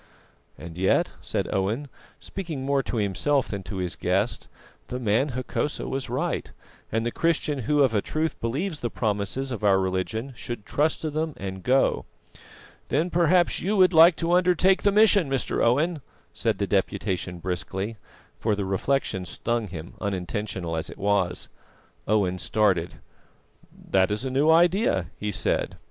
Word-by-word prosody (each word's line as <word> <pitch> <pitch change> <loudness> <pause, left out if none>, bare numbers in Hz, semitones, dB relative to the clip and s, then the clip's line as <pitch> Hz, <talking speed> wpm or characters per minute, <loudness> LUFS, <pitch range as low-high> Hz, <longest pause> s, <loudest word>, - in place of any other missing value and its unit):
"And 85 +1 -9
yet," 95 - +2
said - - -2
Owen, 105 +9 -1 0.3
speaking 160 -9 -5
more 140 0 +2
to 125 - -4
himself 120 +7 +1
than 100 -2 -4
to 100 - -6
his 90 -2 -2
guest, - - -1 0.4
"the 125 - -4
man 125 +4 +1
Hokosa 130 +3 -2
was 135 0 -3
right, - - -2 0.4
and 115 +1 0
the 120 - 0
Christian 155 -2 0
who 145 +4 +2
of 130 -4 +2
a 105 - +2
truth 155 +6 -2
believes 150 +8 -2
the 120 - -2
promises 110 +5 -2
of 115 -3 -5
our 100 -2 +5
religion 95 +7 -2
should 120 -3 -6
trust 155 +2 0
to 155 - -2
them 155 0 -2
and 95 -1 -6
go." 130 +6 +2 0.8
"Then 165 +5 0
perhaps 175 +1 +3
you 205 +4 0
would 185 -1 +5
like 165 +1 +8
to 165 +1 -1
undertake 180 +1 +4
the 205 - +3
mission, 205 -6 +5
Mr. 135 -1 0
Owen," 150 +7 +2 0.3
said - - 0
the - - 0
Deputation 90 -1 -1
briskly; 95 +5 -4 0.4
for 110 -2 +1
the 100 -1 -2
reflection 95 0 0
stung 115 +5 -2
him, 85 -2 -8
unintentional 95 -3 -3
as 80 - -3
it - - -10
was. 100 -3 0 0.6
Owen 95 -4 +1
started. 95 -7 +1 0.8
"That 95 -1 +1
is 105 +5 -2
a 130 - -2
new 140 +4 +3
idea," 165 - +3
he 105 0 -2
said. - - -1
120 Hz, 160 wpm, -25 LUFS, 95-155 Hz, 0.8 s, like